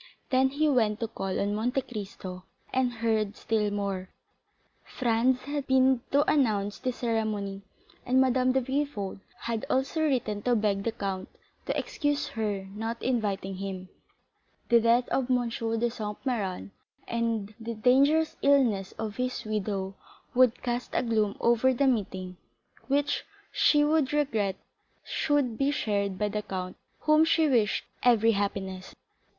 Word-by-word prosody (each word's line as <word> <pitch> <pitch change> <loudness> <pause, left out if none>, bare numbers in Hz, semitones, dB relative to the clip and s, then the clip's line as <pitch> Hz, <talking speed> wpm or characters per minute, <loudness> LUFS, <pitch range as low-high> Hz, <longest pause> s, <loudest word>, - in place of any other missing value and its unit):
Then 260 0 +4
he 300 +3 +1
went 225 -6 +2
to 230 - 0
call 195 -4 -3
on 200 +1 0
Monte 245 +5 0
Cristo 195 -5 -7 0.3
and 255 -1 +2
heard 220 -3 -1
still 215 -2 0
more. 200 -2 -3 0.7
Franz 245 +1 +1
had 285 -1 -4
been 260 -1 +4
to 285 +1 +3
announce 205 -8 +1
the 255 - -1
ceremony, 215 -5 -2 0.4
and 255 +1 +2
Madame 255 0 +3
de 265 +1 +2
Villefort 260 -7 -2 0.2
had 230 -2 -2
also 265 +5 0
written 245 -9 0
to 245 +2 +2
beg 205 -2 0
the 230 - +1
count 195 -3 -4 0.4
to - - 0
excuse 290 -1 -1
her 205 -3 -2
not 225 +2 -4
inviting 205 -6 -1
him; 190 -1 -5 0.8
the 235 -1 +6
death 235 +2 +3
of 260 -1 0
M. 245 -2 +2
de 230 +1 -1
Saint 210 -3 -5
Méran 200 -7 -2 0.4
and 230 -3 -1
the 230 0 -5
dangerous 280 +7 +3
illness 240 -9 +3
of 220 -2 -5
his 250 -2 -2
widow 200 -2 -2 0.4
would 250 -1 +3
cast 245 0 -3
a - - +2
gloom 215 -4 0
over 240 +2 +3
the 280 - +2
meeting 190 -7 -1 0.5
which 285 +1 +1 0.3
she 295 -1 +4
would 300 -3 +2
regret 225 -10 +1 0.5
should 280 -7 0
be 275 0 +3
shared 200 -8 -1
by 210 - 0
the 210 +1 -2
count 185 -2 -5 0.3
whom 305 +1 +5
she 320 -1 +3
wished 230 -6 +2 0.2
every 230 -2 +5
happiness. 195 -2 -3
230 Hz, 145 wpm, -28 LUFS, 205-260 Hz, 0.8 s, the